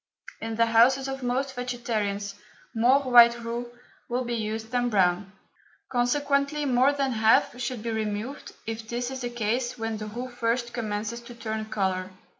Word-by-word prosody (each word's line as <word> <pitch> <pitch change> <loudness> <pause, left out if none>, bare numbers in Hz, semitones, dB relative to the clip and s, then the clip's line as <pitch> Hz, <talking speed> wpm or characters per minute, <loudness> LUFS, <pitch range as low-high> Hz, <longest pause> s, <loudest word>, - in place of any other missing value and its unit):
In 225 0 -3
the 230 +1 +4
houses 245 +4 +4
of 270 0 -4
most 260 +2 -1
vegetarians 220 -5 -2 0.4
more 250 +5 +4
white 240 -2 +7
roux 235 +1 -4 0.4
will 245 +1 0
be 240 -1 -3
used 220 0 -3
than 245 -1 +1
brown, 190 -2 +2 0.6
consequently 280 +3 +1
more 260 +1 +4
than 275 -2 0
half 225 +2 +3
should 240 -3 -3
be 230 - -2
removed 220 +5 -3
if 225 0 -5
this 245 +1 -2
is 265 0 -5
the 245 - -2
case 240 +2 -1
when 225 -1 -3
the 215 0 -6
roux 240 +4 -5
first 240 0 -1
commences 220 0 -3
to 235 0 -11
turn 220 -2 -4
colour. 190 -3 -1
235 Hz, 165 wpm, -26 LUFS, 220-250 Hz, 0.6 s, white